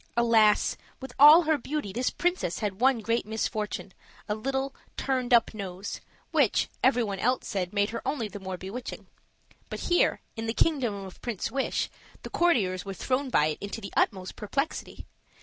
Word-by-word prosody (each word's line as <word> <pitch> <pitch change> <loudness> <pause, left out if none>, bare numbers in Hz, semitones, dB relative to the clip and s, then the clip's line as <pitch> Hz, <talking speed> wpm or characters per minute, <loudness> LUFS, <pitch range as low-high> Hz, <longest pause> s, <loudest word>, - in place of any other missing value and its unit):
Alas! 225 -3 +4 0.2
with 265 -2 -8
all 300 +5 +10
her 310 -2 +2
beauty, 275 -7 -4
this 250 +2 0
princess 355 - -1
had 205 0 -3
one 260 -3 +4
great 230 +2 0
misfortune, 215 -3 -3 0.3
a 210 - 0
little 270 +5 -2 0.2
turned 255 -2 -1
up 235 -2 +5
nose, 195 -2 -6 0.3
which, - - +2
every 250 -1 +4
one 200 -3 -3
else 250 +4 +1
said 185 -2 -2
made 205 0 +1
her 230 - -4
only 260 -6 -2
the 205 - -8
more 190 -1 -5
bewitching. 200 +8 -7 0.6
But - - -5
here, 350 - +2
in 225 -1 -4
the 225 - -2
kingdom 265 -10 +2
of 190 - -12
Prince 230 -3 -3
Wish, 270 +2 0 0.4
the - - -8
courtiers 205 - +2
were 195 -1 -6
thrown 265 +5 -1
by 150 - +3
it 155 -1 -1
into 200 +2 -5
the 200 - -8
utmost 185 -2 0
perplexity. 275 +8 -3
225 Hz, 175 wpm, -28 LUFS, 200-265 Hz, 0.6 s, all